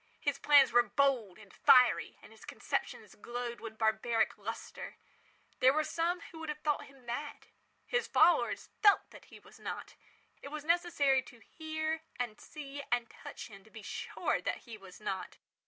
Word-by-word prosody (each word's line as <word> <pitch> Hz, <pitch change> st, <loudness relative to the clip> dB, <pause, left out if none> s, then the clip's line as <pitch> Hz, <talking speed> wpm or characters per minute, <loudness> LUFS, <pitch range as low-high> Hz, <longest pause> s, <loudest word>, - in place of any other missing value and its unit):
His 285 Hz, -1 st, -1 dB
plans 285 Hz, -4 st, +6 dB
were 240 Hz, +1 st, +7 dB
bold 240 Hz, -4 st, +1 dB
and 210 Hz, -3 st, -16 dB
fiery, 250 Hz, -1 st, +5 dB
and -, -, -14 dB
his -, -, -16 dB
conceptions -, -, -4 dB
glowed 240 Hz, 0 st, -5 dB
with 220 Hz, -1 st, -8 dB
barbaric 220 Hz, +1 st, +1 dB
lustre. 225 Hz, +2 st, -7 dB, 0.6 s
There 260 Hz, +3 st, +5 dB
are 310 Hz, -, +3 dB
some 340 Hz, +3 st, -1 dB
who 320 Hz, -, -10 dB
would 320 Hz, -1 st, -6 dB
have 300 Hz, -, -3 dB
thought 300 Hz, -1 st, 0 dB
him 270 Hz, -3 st, -19 dB
mad. 285 Hz, +5 st, -5 dB, 0.4 s
His 485 Hz, 0 st, 0 dB
followers 335 Hz, +3 st, +3 dB
felt 410 Hz, -2 st, +5 dB
that -, -, -14 dB
he -, -, -14 dB
was -, -, -17 dB
not. -, -, -6 dB, 0.5 s
It -, -, -8 dB
was 300 Hz, +1 st, -6 dB
necessary 320 Hz, -6 st, +3 dB
to 245 Hz, -1 st, -15 dB
hear 315 Hz, +1 st, -3 dB
and 240 Hz, -2 st, -4 dB
see 285 Hz, -2 st, -8 dB
and 240 Hz, -1 st, 0 dB
touch -, -, -9 dB
him 195 Hz, -2 st, -13 dB
to 220 Hz, -, -19 dB
be 220 Hz, -1 st, -11 dB
sure -, -, -2 dB
that -, -, -3 dB
he 235 Hz, -3 st, -8 dB
was 195 Hz, -3 st, -13 dB
not. 190 Hz, -3 st, -4 dB
260 Hz, 175 wpm, -33 LUFS, 225-305 Hz, 0.6 s, were